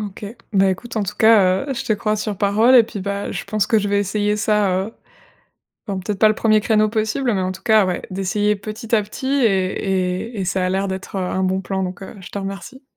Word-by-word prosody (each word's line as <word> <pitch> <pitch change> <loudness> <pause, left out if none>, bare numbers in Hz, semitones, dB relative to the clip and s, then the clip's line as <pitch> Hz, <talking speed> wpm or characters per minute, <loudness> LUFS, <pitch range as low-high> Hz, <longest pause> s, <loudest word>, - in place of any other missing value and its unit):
OK. 205 0 -7 0.3
Bah 195 -1 +4
écoute, 230 +5 -6
en 215 - +1
tout 195 - -4
cas, 205 -1 +4
heu, 270 - -2
je - - -4
te - - +1
crois 215 +1 -1
sur 210 -1 -3
parole 215 +6 +4
et 245 - +9
puis, 215 -2 -7
bah, 200 +1 -3
je - - -5
pense 215 -2 -1
que 220 - +3
je 205 0 -2
vais 200 0 +2
essayer 205 +1 0
ça, 210 -2 +2 0.2
heu 225 - -10 0.9
bon, 195 -2 -3
peut-être 200 +1 -4
pas 215 - +5
le 215 - +2
1er 215 -1 +3
créneau 215 -1 +2
possible, 220 +4 -1
mais 195 - 0
en 185 0 -1
tout 190 +1 -12
cas, 215 -3 +4
ouais, 180 - -2
d'essayer 205 +3 0
petit 215 +3 -8
à 215 - +3
petit 210 +5 -7
et 190 -5 0
et 205 - -4
et - - -1
ça 185 0 -1
a - - 0
l'air 190 +1 -1
d'être, 190 +1 -6
heu, 190 - -1
un 185 +1 -1
bon 190 +1 0
plan, 190 0 -3
donc, 180 +1 -6
heu, 190 - -9
je 180 - -10
te - - -5
remercie. 195 +7 -7
205 Hz, 255 wpm, -20 LUFS, 190-215 Hz, 0.9 s, et